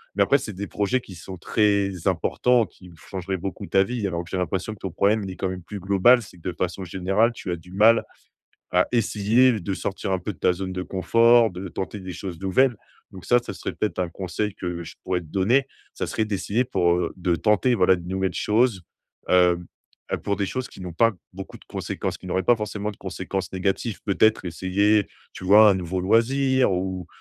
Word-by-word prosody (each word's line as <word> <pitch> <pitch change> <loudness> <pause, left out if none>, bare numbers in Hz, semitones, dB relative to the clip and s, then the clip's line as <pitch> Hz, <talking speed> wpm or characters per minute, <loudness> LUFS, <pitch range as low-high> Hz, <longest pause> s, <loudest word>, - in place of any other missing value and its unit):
mais 100 - +4
après, 140 +8 +4
c'est 125 -4 -6
des 100 +1 -6
projets 105 +5 0
qui 95 -6 -12
sont 95 +2 -9
très 100 -2 +1
importants, 115 +6 +2
qui 90 -1 -16
changeraient 95 +2 -5
beaucoup 95 +2 -5
ta 95 0 +3
vie, 120 -3 -3
alors 85 -2 -2
que - - -14
j'ai - - -4
l'impression 95 +3 -2
que 105 - -14
ton 95 - -5
problème, 100 +4 +2
il 95 - -5
est - - -8
quand 95 - -1
même 90 -1 -5
plus 100 +3 -7
global. 100 +6 +4
C'est 95 - -13
que 90 +1 -6
de - - -2
façon 90 +2 -3
générale, 95 +6 +1
tu 105 -5 -8
as 85 - 0
du 85 +2 -15
mal 110 +4 +5 0.7
à 90 0 +3
essayer 115 +1 +3
de 95 +1 -3
sortir 95 0 -3
un 95 - +2
peu 100 +4 -5
de 80 - -23
ta - - +3
zone 95 +1 -4
de 90 - -3
confort, 115 +5 +4
de 90 +2 -6
tenter 95 +3 -5
des 95 -1 -7
choses 90 -3 -7
nouvelles. 120 +7 +2 0.4
Donc 95 -2 -11
ça, 120 - +4
ça 120 - -4
serait - - -5
peut-être 105 -3 -2
un 90 - 0
conseil 95 +4 -4
que 90 -1 -4
je - - -10
pourrais 90 -1 -1
te - - -13
donner, 115 - +2 0.3
ça - - -4
serait 110 - -1
d'essayer 105 +3 -1
pour, 90 -8 +1
heu, 90 -1 -2
de 90 -1 +1
tenter, 105 +7 +2
voilà, 95 -2 +4
de 85 -1 -9
nouvelles 95 +1 -1
choses, 110 -3 +1 0.5
hem, 90 -1 +4 0.6
pour 100 - +1
des 100 - -1
choses 130 +6 -4
qui - - -13
n'ont 90 -1 -6
pas 115 +7 +3 0.2
beaucoup 95 +1 -9
de - - -20
conséquences, - - -4
qui - - -11
n'auraient 95 +1 0
pas 120 +3 +4
forcément 105 -1 -4
de 100 - -15
conséquences 95 -1 -4
négatives. 95 +4 -2
Peut-être 110 +2 +2
essayer, 100 +4 +1 0.2
tu 95 - -9
vois, 105 +3 +8
un 100 - +5
nouveau 90 0 -3
loisir 130 +6 +3
ou 90 -1 -3
95 Hz, 220 wpm, -24 LUFS, 90-110 Hz, 0.7 s, vois